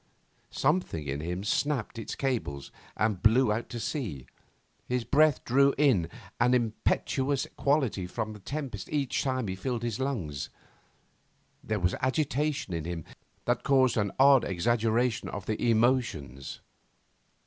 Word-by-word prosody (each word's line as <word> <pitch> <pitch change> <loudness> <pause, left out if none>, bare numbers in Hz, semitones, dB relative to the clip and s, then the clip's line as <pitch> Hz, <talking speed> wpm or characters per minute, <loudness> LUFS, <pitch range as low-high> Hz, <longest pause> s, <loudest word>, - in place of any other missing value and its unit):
Something 135 - 0
in 70 +1 -2
him 90 +4 -3
snapped 120 +1 -1
its 115 - -5
cables 115 - -2 0.3
and 105 -3 0
blew 110 +1 +4
out 115 +2 -4
to 120 - -5
sea. 110 - -4 0.6
His 125 -1 0
breath 150 +2 +3
drew 140 +3 +4
in 125 - +3 0.3
an 125 +1 +4
impetuous 130 +4 0
quality 135 -10 +1
from 110 +4 -4
the 105 - -11
tempest 130 -3 -5
each 145 -4 0
time 130 -4 -1
he 95 - -2
filled 120 +4 -3
his 115 -1 -2
lungs. 95 - -3 1.1
There 110 -1 -1
was 90 0 +1
agitation 140 - 0
in 80 -2 -3
him 85 -2 -4 0.4
that - - +1
caused 130 -3 +3
an 100 -3 0
odd 135 -1 +7
exaggeration 115 +5 +1
of 100 -1 -6
the 110 +2 0
emotions. 110 - 0
120 Hz, 135 wpm, -29 LUFS, 95-135 Hz, 1.1 s, odd